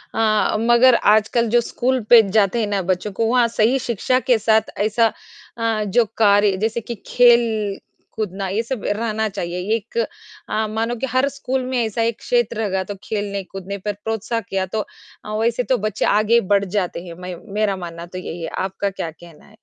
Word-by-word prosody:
अ, 215 -2 +2
मगर 240 +2 +5
आजकल 220 +3 +3
जो 240 +2 +4
स्कूल 255 +2 -1
पर 225 -4 +7
जाते 210 +2 +2
हैं 215 - 0
ना 200 -1 0
बच्चों 185 +3 -2
को 225 +4 -1
वहाँ 245 0 +3
सही 235 +3 +2
शिक्षा 250 +1 0
के 255 -2 +2
साथ 220 0 +2
ऐसा 220 +2 +2 0.5
अ, 225 -2 0
जो 210 +4 +2
कार्य 205 -2 +4
जैसे 225 +4 -1
कि 235 +2 -6
खेल 230 -4 +3 0.4
कूदना 195 -2 -3
ये 205 +4 0
सब 235 -2 -5
रहना 220 +1 -1
चाहिए 180 -3 -4 0.2
एक 225 - -7 0.5
अ, 220 0 0
मानो 225 +2 -2
कि 245 - -3
हर 255 +2 +2
स्कूल 265 -2 -3
में 255 0 -2
ऐसा 220 +1 -2
एक 230 -1 0
क्षेत्र 235 -2 0
होगा 190 -2 -1
तो 200 +2 -7
खेलने 205 -2 -3
कूदने 195 +1 -7
पर 205 +2 -3
प्रोत्साह 225 +1 -2
किया 190 -2 -2
तो 210 +3 -3 0.4
अ, 210 - -5
वैसे 235 +2 +1
तो 255 +1 +1
बच्चे 215 0 -1
आगे 215 +3 +4
बढ़ 200 0 +3
जाते 180 -3 -2
हैं 170 - -8
मैं 180 0 -6 0.2
मेरा 210 -1 +1
मानना 170 -2 -7
तो 180 +1 -9
यही 175 -2 -6
है, 165 - -4
आपका 195 +1 -2
क्या 175 -4 -5
कहना 165 0 -16
है? 210 - -20
215 Hz, 195 wpm, -20 LUFS, 200-235 Hz, 0.5 s, पर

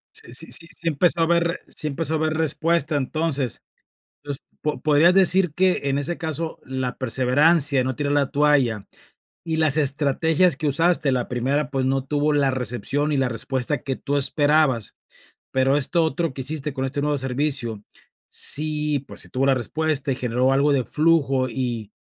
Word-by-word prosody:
Sí 115 - -7
sí 165 +6 -1 0.2
sí 170 - -8
empezó 165 +2 +2
a - - +4
haber 170 +1 0
sí 155 - -4
empezó 160 +2 -2
a - - +1
haber 155 0 -1
respuesta 160 0 0
entonces. 145 -2 -2 0.6
Pues 145 -2 -5 0.2
po 150 - -3
podrías 155 +4 +4
decir 185 -3 +5
que 185 +1 +2
en 135 0 0
ese 155 +5 -3
caso 160 0 -4
la 130 -1 -4
perseverancia, 135 +3 +3
no 130 - -2
tirar 145 -1 -2
la 145 -2 +1
toalla 140 -8 +2 0.6
y 160 -1 -2
las 155 -3 +2
estrategias 155 +4 +2
que 155 - -3
usaste, 160 -1 +2
la 125 -1 -1
primera 135 +4 -1
pues 135 -2 -1
no 135 0 0
tuvo 150 +2 0
la 145 -2 +2
recepción 130 +4 -2
y - - +1
la 130 - +1
respuesta 130 +4 -2
que 135 -1 -3
tú 145 - -3
esperabas, 145 -3 +1 0.5
pero 130 +1 +2
esto 155 +4 +1
otro 160 0 -2
que 130 - -5
hiciste 150 +1 -4
con 130 0 -4
este 135 +2 -3
nuevo 145 0 0
servicio, 130 -4 -1 0.5
sí, 150 -1 -1
pues, 135 - -10
sí - - -12
tuvo 135 +2 0
la 135 - +4
respuesta 145 +2 -1
y - - -1
generó 125 +2 0
algo 140 +2 +2
de 130 -3 +1
flujo 145 -5 +1
y, 120 -4 -4
145 Hz, 175 wpm, -22 LUFS, 130-155 Hz, 0.6 s, decir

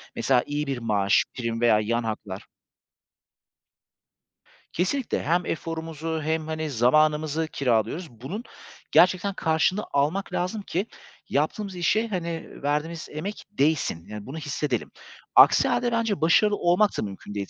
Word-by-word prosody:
Mesela 130 -2 +2
iyi 145 0 -3
bir 135 - -2
maaş, 105 -4 +2
prim 115 -2 -3
veya 115 -3 +5
yan 115 +2 0
haklar. 105 -3 -5 2.3
Kesinlikle 230 +9 -1
hem 170 +5 +1
eforumuzu 160 -1 -4
hem, 160 0 -1
hani, 155 -1 -3
zamanımızı 150 +5 +2
kiralıyoruz. 135 - 0
Bunun 135 - -7 0.5
gerçekten 185 +2 +4
karşılığını 175 +4 +1
almak 150 +8 0
lazım 185 +5 -2
ki 195 +1 -2 0.4
yaptığımız 185 +7 -1
işe, 215 +6 +1
hani, 170 -5 -4
verdiğimiz 155 +3 -2
emek 190 +8 -6
değsin. 145 - 0
Yani 105 -1 -8
bunu 140 +5 -7
hissedelim. 145 -5 -2 0.4
Aksi - - +7
hâlde 240 -1 +1
bence 225 -5 0
başarılı 205 +6 +4
olmak 180 +4 +2
da - - 0
mümkün 100 0 -7
değil, 100 -1 -3
155 Hz, 130 wpm, -25 LUFS, 125-180 Hz, 2.3 s, Aksi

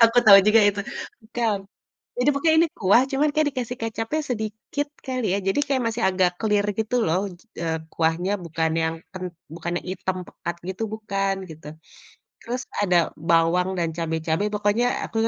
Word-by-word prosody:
aku 230 +1 +4
tahu 200 -3 +10
juga 220 +1 +6
itu, 200 0 -1 0.4
bukan. 225 -1 0 0.6
Jadi 250 +4 +3
pokoknya 315 +3 +3
ini 335 - +4
kuah, 200 +5 +5
cuman 280 +3 +2
kayaknya 305 0 +2
dikasih 250 -3 -4
kecapnya 225 +7 -2
sedikit 220 +5 -3 0.2
kali 255 -3 -2
ya, - - +2
jadi 195 - +1
kayak 275 -3 0
masih 225 +1 -3
agak 185 -1 +1
clear 210 -1 +2 0.2
gitu 220 +2 -1
loh, 165 +3 +2 0.4
eee, 165 -1 -1 0.2
kuahnya 165 +4 +1
bukan 160 0 0
yang 160 0 0 0.2
ken 185 -2 -6 0.2
bukan 165 +2 -5
yang - - -18
hitam 185 0 -3
pekat 170 - -5
gitu 190 +4 -4
bukan, 195 -3 -1
gitu. 160 -1 -12 0.8
Terus 250 +2 -4 0.2
ada 185 -3 +3 0.3
bawang 170 +2 +3
dan 170 -2 0
cabe-cabe 160 +2 -1
pokoknya 205 +3 +2 0.2
aku - - -7
205 Hz, 165 wpm, -24 LUFS, 175-240 Hz, 0.8 s, tahu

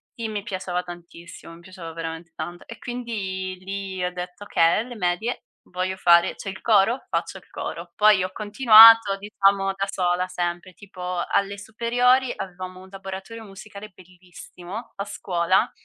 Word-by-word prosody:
sì, 230 -3 -4
mi 210 -2 -4
piaceva 185 -4 -3
tantissimo, 170 -1 -12
mi 170 - -14
piaceva 170 -2 -10
veramente 165 0 -7
tanto 175 +2 -7
e 230 - -9
quindi 195 -7 -5
lì 195 -1 -5
ho 180 - -1
detto: 180 +2 -8
"Okay, 165 -2 +3
alle 245 0 -8
medie 190 +5 -2 0.3
voglio 185 +1 -3
fare 170 -1 +4
c'è 195 - -7
il 190 - -8
coro? 220 +3 +3
Faccio - - -2
il - - -17
coro." - - -7
Poi 210 -3 +5
ho 185 - -4
continuato, 220 -1 +7
diciamo 195 -1 +1
da 195 0 -1
sola, 180 -1 0
sempre, 175 0 -4
tipo 180 -3 -5
alle 200 0 0
superiori 245 +4 +1
avevamo 185 -1 -8
un 190 - -14
laboratorio 195 +3 -8
musicale 200 +1 -11
bellissimo, 180 +3 -11
a 200 +1 -4
scuola. 185 -2 0
190 Hz, 155 wpm, -23 LUFS, 180-210 Hz, 0.3 s, continuato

